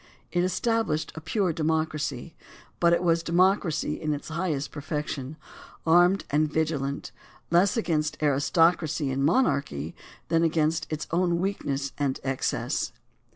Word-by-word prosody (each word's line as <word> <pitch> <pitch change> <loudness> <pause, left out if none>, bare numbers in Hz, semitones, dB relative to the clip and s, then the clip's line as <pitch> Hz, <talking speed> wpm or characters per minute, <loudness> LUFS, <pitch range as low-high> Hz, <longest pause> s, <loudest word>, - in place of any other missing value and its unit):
It 175 -1 +1
established 220 -3 0
a 160 - -8
pure 180 +2 0
democracy, 155 -2 -1 0.5
but 170 -1 +4
it 170 - +2
was 170 -1 +3
democracy 170 -3 +1
in 155 -2 0
its 145 - -8
highest 160 -4 -2
perfection, 150 -1 -4 0.5
armed 175 +4 +4
and 150 +1 +2
vigilant, 150 -3 -1 0.4
less 180 +5 +4
against 155 -7 0
aristocracy 155 +1 +2
and 135 +1 -1
monarchy 140 - +1 0.4
than 165 - +3
against 160 -1 +1
its 155 -1 -3
own 175 0 +2
weakness 140 -8 -2
and 140 -2 0
excess. 135 -1 -1
160 Hz, 125 wpm, -27 LUFS, 145-175 Hz, 0.5 s, but